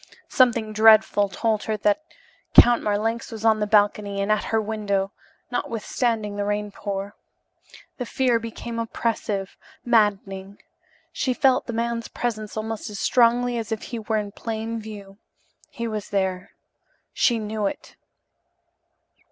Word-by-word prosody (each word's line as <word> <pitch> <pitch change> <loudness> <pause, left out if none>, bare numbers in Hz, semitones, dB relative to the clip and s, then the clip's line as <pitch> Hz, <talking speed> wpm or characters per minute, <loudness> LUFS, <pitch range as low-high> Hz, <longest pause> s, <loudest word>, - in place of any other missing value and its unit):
Something 235 -4 +3
dreadful 215 -2 +5
told 215 +2 -1
her 215 -1 -1
that 210 +6 +2 0.6
Count 240 -1 +6
Marlanx 225 +3 -1
was 220 -1 -6
on 220 -1 +4
the 210 - 0
balcony 205 -1 +2
and 200 +1 0
at 215 - +1
her 225 - +1
window, 205 -2 -1 0.4
notwithstanding 230 -2 -1
the 205 - -1
rain 205 0 -2
pour. 200 0 -5 0.9
The 250 - -3
fear 250 -2 +2
became 230 +1 -6
oppressive, 220 -4 -2 0.3
maddening. 200 -4 +1 0.6
She 255 -3 -1
felt 260 0 +3
the 235 - -4
man's 230 0 -2
presence 215 -3 -4
almost 220 +1 -4
as 205 -2 -7
strongly 245 0 +3
as 225 -1 -6
if 220 - -3
he 235 - -5
were 220 0 -1
in 205 -1 -3
plain 225 +1 -4
view. 205 -2 -10 0.5
He 235 -1 -5
was 215 -2 -4
there, 190 -2 -1 0.6
she 240 - +3
knew 215 -1 -2
it. - - -7
215 Hz, 140 wpm, -24 LUFS, 205-230 Hz, 0.9 s, Count